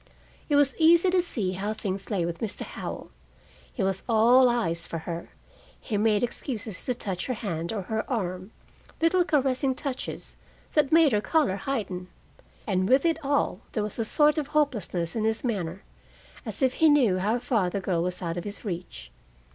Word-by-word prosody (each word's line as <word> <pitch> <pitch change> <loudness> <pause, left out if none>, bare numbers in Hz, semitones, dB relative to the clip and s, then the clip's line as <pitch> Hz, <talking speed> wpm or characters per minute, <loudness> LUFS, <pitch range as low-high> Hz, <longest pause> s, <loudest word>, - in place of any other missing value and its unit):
It 290 - +3
was 285 -2 +4
easy 340 +3 +6
to 365 0 +4
see 215 - -2
how 200 +3 -2
things 195 -2 -4
lay 190 -6 0
with 170 0 -4
Mr. 220 -3 -4
Howell. - - -7 0.6
He 220 - -3
was 190 0 0
all 240 +3 +6
eyes 170 -9 -1
for 165 - -4
her: 170 +1 -6 0.5
he 220 - -4
made 210 0 +2
excuses 225 -5 -4
to 250 - 0
touch 190 -6 -4
her 255 - -1
hand 170 -6 -3
or 210 -3 -3
her 220 +3 -3
arm 185 -5 -3 0.5
little 350 +2 +3
caressing 270 -5 +1
touches 270 -2 -5 0.4
that 295 -3 +3
made 320 -3 +6
her 210 -2 +2
color 295 - +2
heighten. 195 -6 -3 0.6
And 185 -2 0
with 265 +4 +4
it 325 -1 +1
all, 280 -9 +1
there 215 - 0
was 210 +2 -5
a - - +2
sort 295 +7 +3
of 290 - -3
hopelessness 220 - -1
in 220 - -1
his 220 0 0
manner, 195 -7 -3 0.6
as - - -3
if 260 -1 +3
he 320 - +7
knew 245 -11 +4
how 210 +5 +1
far 220 -6 0
the 200 - -2
girl 180 -3 0
was 180 +1 -3
out 170 0 -3
of 175 - -3
his 205 +2 -8
reach. 170 - -6
220 Hz, 185 wpm, -27 LUFS, 185-275 Hz, 0.6 s, he